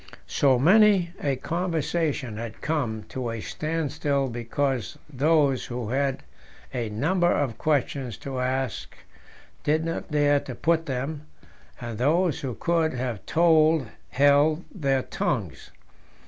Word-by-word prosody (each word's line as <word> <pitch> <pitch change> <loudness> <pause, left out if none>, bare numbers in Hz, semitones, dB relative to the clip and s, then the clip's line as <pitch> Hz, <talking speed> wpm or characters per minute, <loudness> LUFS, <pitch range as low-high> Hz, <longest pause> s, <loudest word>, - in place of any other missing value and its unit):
So 135 -3 +3
many 190 - +5
a 140 -2 0
conversation 160 -6 -2
had 115 0 -6
come 125 -9 -2
to 125 -2 -4
a 115 0 -4
standstill 145 -1 -2
because 120 +1 -2
those 145 -1 +2
who 120 -3 -4
had 135 +1 -1 0.5
a 120 -4 -2
number 175 - +1
of 135 -6 -1
questions 140 -5 -1
to 135 -2 -4
ask 130 -3 -2 0.7
did 155 +2 +1
not 165 +2 -4
dare 145 -1 +3
to 130 -3 -8
put 165 +4 +1
them, 145 +3 -4 0.5
and 115 -3 -6
those 160 +5 +2
who 130 -4 -4
could 165 -4 0
have 125 -4 -3
told 160 -5 +4 0.2
held 145 +4 +3
their 135 -7 0
tongues. - - -3
140 Hz, 125 wpm, -25 LUFS, 125-160 Hz, 0.7 s, many